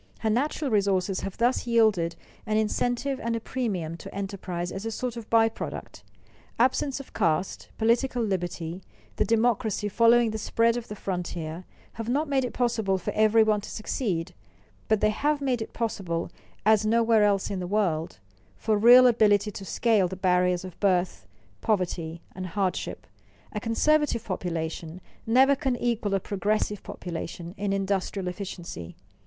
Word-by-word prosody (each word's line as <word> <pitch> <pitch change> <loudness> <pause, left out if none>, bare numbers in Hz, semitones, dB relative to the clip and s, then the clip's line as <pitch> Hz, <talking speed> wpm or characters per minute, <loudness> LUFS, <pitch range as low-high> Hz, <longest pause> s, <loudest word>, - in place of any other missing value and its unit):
Her 220 - +1
natural 275 +3 0
resources 195 -2 +1
have 195 - -6
thus 240 +1 +1
yielded 215 -8 +3 0.3
an 215 0 +1
incentive 245 +5 0
and 230 0 -1
a - - -1
premium 195 -10 -3
to - - -10
enterprise 185 -3 -4
as 195 - -5
a 225 - -2
sort 240 +2 -3
of 230 -2 -8
by 225 -1 +5
product. 225 - -7 0.5
Absence 260 +3 +1
of 275 - -11
caste, 165 +3 0
political 235 +2 +2
liberty, 175 -3 -3 0.4
the - - +2
democracy 225 -2 +1
following 230 +2 +4
the 220 - -4
spread 230 +2 +2
of 240 -1 -4
the 210 - -6
frontier, 175 -3 -4 0.3
have 225 0 -5
not 295 +5 +1
made 275 -2 +1
it 250 - -2
possible 220 -6 0
for 180 - -3
every 220 +1 +5
one 215 -1 +2
to - - -9
succeed, 185 -6 -3 0.5
but 220 -2 +2
they 215 - +4
have 290 +7 0
made 260 -4 0
it 220 - -5
possible, 190 -7 -3 0.3
as 215 -1 +5
nowhere 225 0 +3
else 200 -1 +2
in 195 - -2
the 180 - -4
world, 175 - 0 0.4
for 215 -2 +1
real 245 +3 +8
ability 215 -3 +4
to 195 - -8
scale 205 +1 +2
the 190 - -6
barriers 180 -1 +2
of 185 - -10
birth, 180 - +1 0.3
poverty, 170 -5 -1
and 185 0 -5
hardship. 190 0 -2 0.5
A 210 - -2
conservative 240 +2 +1
population 165 -2 -4 0.3
never 265 +4 +5
can 265 -2 -1
equal 230 -4 0
a - - +2
progressive 205 +1 -1
population 170 0 -6
in 205 -2 -2
industrial 195 -1 -1
efficiency. 175 - -6
210 Hz, 160 wpm, -27 LUFS, 185-230 Hz, 0.5 s, real